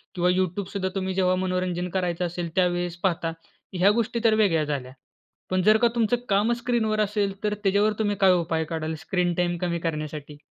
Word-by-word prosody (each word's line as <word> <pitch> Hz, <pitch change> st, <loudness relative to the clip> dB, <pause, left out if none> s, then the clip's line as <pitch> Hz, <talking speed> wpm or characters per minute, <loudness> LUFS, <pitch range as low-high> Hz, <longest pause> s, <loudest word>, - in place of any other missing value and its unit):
किंवा 180 Hz, 0 st, +2 dB
YouTube 185 Hz, +1 st, 0 dB
सुद्धा 190 Hz, -2 st, -1 dB
तुम्ही 190 Hz, -1 st, -2 dB
जेव्हा 185 Hz, -1 st, +2 dB
मनोरंजन 185 Hz, -1 st, -1 dB
करायचं 180 Hz, -1 st, 0 dB
असेल, 175 Hz, 0 st, -4 dB
त्यावेळेस 175 Hz, -1 st, +1 dB
पाहता 170 Hz, -3 st, 0 dB, 0.5 s
ह्या 190 Hz, +3 st, +5 dB
गोष्टीतर 230 Hz, 0 st, +1 dB
वेगळ्या 190 Hz, -8 st, +3 dB
झाल्या. 140 Hz, -4 st, -4 dB, 0.6 s
पण 185 Hz, 0 st, +1 dB
जर 215 Hz, +3 st, +6 dB
का 235 Hz, -, +4 dB
तुमचं 230 Hz, 0 st, +2 dB
कामचं 215 Hz, +4 st, +2 dB
स्क्रीनवर 225 Hz, -3 st, 0 dB
असेल, 205 Hz, -1 st, 0 dB
तर 210 Hz, 0 st, +1 dB
त्याच्यावर 205 Hz, +2 st, +3 dB
तुम्ही 205 Hz, -2 st, +1 dB
काय 190 Hz, -1 st, +6 dB
उपाय 165 Hz, -2 st, 0 dB
काढाल 160 Hz, 0 st, -3 dB
स्क्रीन 180 Hz, -1 st, 0 dB
टाईम 175 Hz, 0 st, 0 dB
कमी 170 Hz, -1 st, -1 dB
करण्यासाठी? 150 Hz, -2 st, -5 dB
185 Hz, 175 wpm, -25 LUFS, 175-205 Hz, 0.6 s, जर